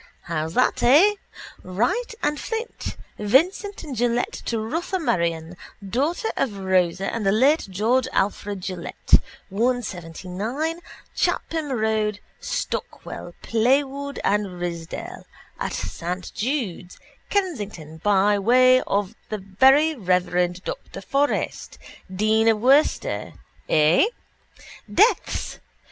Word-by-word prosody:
How's 160 Hz, 0 st, -3 dB
that, 255 Hz, -, +2 dB
eh? 310 Hz, +12 st, +6 dB, 0.5 s
Wright 245 Hz, -, -1 dB
and 295 Hz, 0 st, 0 dB
Flint, 455 Hz, 0 st, -5 dB, 0.2 s
Vincent 345 Hz, -, +2 dB
and 290 Hz, -5 st, -6 dB
Gillett 240 Hz, +1 st, +1 dB
to 230 Hz, -, -1 dB
Rotha 320 Hz, -, -2 dB
Marion 170 Hz, -, -1 dB, 0.3 s
daughter 300 Hz, -, 0 dB
of 225 Hz, -7 st, -1 dB
Rosa 190 Hz, 0 st, +1 dB
and 230 Hz, -, -2 dB
the 195 Hz, -, +3 dB
late 270 Hz, +8 st, +3 dB
George 230 Hz, +7 st, +1 dB
Alfred 200 Hz, 0 st, -1 dB
Gillett, 180 Hz, -2 st, +1 dB, 0.3 s
179 215 Hz, -, -2 dB, 0.4 s
Clapham 315 Hz, -3 st, -1 dB
road, 215 Hz, -2 st, 0 dB, 0.2 s
Stockwell, -, -, -5 dB
Playwood 275 Hz, +4 st, +1 dB
and 200 Hz, -3 st, 0 dB
Ridsdale 170 Hz, -2 st, -6 dB, 0.3 s
at -, -, -3 dB
Saint 170 Hz, -, -4 dB
Jude's, 215 Hz, -, -3 dB, 0.3 s
Kensington 210 Hz, -, -3 dB
by 205 Hz, +3 st, +3 dB
the 235 Hz, -2 st, +3 dB, 0.2 s
very 265 Hz, +11 st, +4 dB
reverend 180 Hz, -, 0 dB
Dr -, -, -6 dB
Forrest, 285 Hz, +1 st, -1 dB, 0.3 s
dean 215 Hz, +3 st, +2 dB
of 225 Hz, -1 st, +5 dB
Worcester. 270 Hz, +6 st, +2 dB, 0.4 s
Eh? 155 Hz, -, +5 dB, 0.9 s
Deaths. 440 Hz, +5 st, +2 dB
220 Hz, 100 wpm, -23 LUFS, 185-275 Hz, 0.9 s, eh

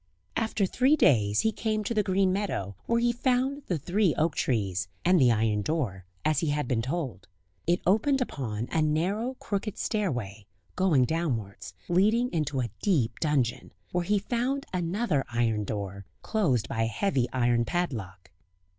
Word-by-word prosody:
After 220 Hz, -2 st, +1 dB
three 260 Hz, +9 st, +3 dB
days 105 Hz, -, +3 dB
he 220 Hz, -, +2 dB
came 215 Hz, -1 st, -1 dB
to 220 Hz, -, -2 dB
the 215 Hz, -, +3 dB
green 190 Hz, -1 st, +2 dB
meadow, 145 Hz, -, -2 dB
where 235 Hz, 0 st, +2 dB
he 240 Hz, 0 st, +3 dB
found 260 Hz, +3 st, 0 dB
the 175 Hz, -, 0 dB
three 180 Hz, +3 st, +1 dB
oak 160 Hz, 0 st, +1 dB
trees, 95 Hz, -6 st, 0 dB, 0.2 s
and 180 Hz, -2 st, +5 dB
the 125 Hz, -2 st, +6 dB
iron 110 Hz, -2 st, +1 dB
door, 105 Hz, -, -2 dB, 0.2 s
as 155 Hz, -2 st, +3 dB
he 160 Hz, -, -1 dB
had 145 Hz, -2 st, -1 dB
been 115 Hz, -2 st, +1 dB
told. 130 Hz, -, -4 dB, 0.4 s
It 175 Hz, +1 st, +2 dB
opened 225 Hz, +9 st, +3 dB
upon 120 Hz, -, -3 dB
a 160 Hz, -, +2 dB
narrow, 190 Hz, +12 st, 0 dB
crooked 205 Hz, -3 st, -3 dB
stairway, 120 Hz, -, -2 dB, 0.3 s
going 170 Hz, -9 st, +3 dB
downwards, 115 Hz, -, -3 dB
leading 215 Hz, +8 st, +3 dB
into 150 Hz, -5 st, 0 dB
a 120 Hz, -, -3 dB
deep 130 Hz, -, +1 dB
dungeon, 140 Hz, -7 st, 0 dB, 0.2 s
where 180 Hz, 0 st, 0 dB
he 205 Hz, +4 st, +2 dB
found 245 Hz, +7 st, -1 dB
another 175 Hz, -, 0 dB
iron 115 Hz, -3 st, +1 dB
door, 100 Hz, -2 st, -5 dB, 0.2 s
closed 135 Hz, -, +1 dB
by 115 Hz, -, -2 dB
a 115 Hz, -, +2 dB
heavy 130 Hz, -, 0 dB
iron 120 Hz, -2 st, +2 dB
padlock. 110 Hz, -, -3 dB
155 Hz, 165 wpm, -28 LUFS, -, 0.4 s, the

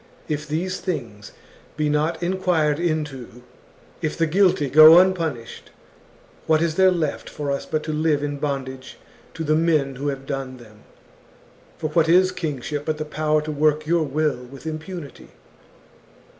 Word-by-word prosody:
If 150 Hz, 0 st, -3 dB
these 175 Hz, +5 st, -2 dB
things 115 Hz, -, -5 dB, 0.5 s
be 150 Hz, -, 0 dB
not 150 Hz, +4 st, 0 dB
enquired 175 Hz, -5 st, +1 dB
into, 150 Hz, -8 st, -3 dB, 0.6 s
if 155 Hz, -, -2 dB
the 165 Hz, -, +2 dB
guilty 175 Hz, -3 st, +2 dB
go 155 Hz, +4 st, +9 dB
unpunished, 165 Hz, -10 st, 0 dB, 0.8 s
what 160 Hz, -1 st, +4 dB
is 165 Hz, -1 st, 0 dB
there 190 Hz, +3 st, +5 dB
left 165 Hz, -5 st, -2 dB
for 145 Hz, -1 st, -4 dB
us 140 Hz, -, -3 dB
but 155 Hz, -1 st, -2 dB
to 155 Hz, -, -4 dB
live 150 Hz, -1 st, +1 dB
in 145 Hz, -1 st, -3 dB
bondage 135 Hz, -2 st, -5 dB, 0.4 s
to 165 Hz, -, -4 dB
the 155 Hz, 0 st, +1 dB
men 155 Hz, -5 st, +1 dB
who 140 Hz, +2 st, -4 dB
have 135 Hz, -1 st, -4 dB
done 135 Hz, -2 st, -5 dB
them. 110 Hz, -3 st, -17 dB, 0.4 s
* -, -, -29 dB
For 155 Hz, -, -3 dB
what 160 Hz, 0 st, +2 dB
is 185 Hz, +2 st, +5 dB
kingship, 150 Hz, -4 st, -4 dB
but 155 Hz, -1 st, -1 dB
the 155 Hz, -, -4 dB
power 155 Hz, 0 st, 0 dB
to 155 Hz, -, -4 dB
work 150 Hz, +1 st, +1 dB
your 170 Hz, +1 st, +2 dB
will 150 Hz, -3 st, -1 dB
with 135 Hz, +4 st, -13 dB
impunity 160 Hz, -1 st, -8 dB
155 Hz, 160 wpm, -22 LUFS, 140-165 Hz, 0.8 s, go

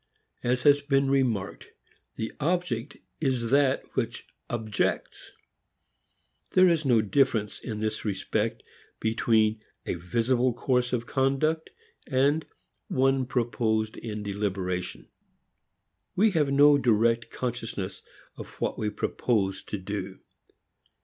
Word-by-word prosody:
As 125 Hz, +1 st, 0 dB
has 145 Hz, 0 st, +6 dB
been 140 Hz, -1 st, +2 dB
remarked, 125 Hz, -8 st, 0 dB, 0.5 s
the 110 Hz, -, -4 dB
object 150 Hz, -5 st, -1 dB, 0.2 s
is 130 Hz, -6 st, 0 dB
that 140 Hz, -1 st, +3 dB
which -, -, -2 dB, 0.2 s
objects. 110 Hz, -4 st, -2 dB, 1.2 s
There 185 Hz, 0 st, +7 dB
is 165 Hz, -3 st, +2 dB
no 120 Hz, -5 st, +4 dB
difference 110 Hz, -1 st, +1 dB
in 110 Hz, -3 st, -5 dB
this 110 Hz, 0 st, -2 dB
respect 105 Hz, +2 st, -2 dB, 0.4 s
between 110 Hz, -1 st, +2 dB, 0.2 s
a -, -, -1 dB
visible 120 Hz, +8 st, +1 dB
course 125 Hz, 0 st, +1 dB
of 120 Hz, -1 st, -1 dB
conduct 140 Hz, +5 st, 0 dB, 0.4 s
and 145 Hz, +4 st, +2 dB, 0.4 s
one 135 Hz, -1 st, +2 dB
proposed 110 Hz, -3 st, 0 dB
in 105 Hz, -2 st, -6 dB
deliberation. 95 Hz, -3 st, -3 dB, 1.1 s
We 215 Hz, +3 st, +4 dB
have 150 Hz, -6 st, +1 dB
no 145 Hz, +1 st, +6 dB
direct 115 Hz, -1 st, +2 dB
consciousness 115 Hz, -6 st, -4 dB, 0.4 s
of -, -, -7 dB
what -, -, -2 dB
we 105 Hz, -, 0 dB
purpose 105 Hz, -2 st, -1 dB
to 105 Hz, -, -4 dB
do. 95 Hz, 0 st, -5 dB
120 Hz, 110 wpm, -27 LUFS, 110-135 Hz, 1.2 s, There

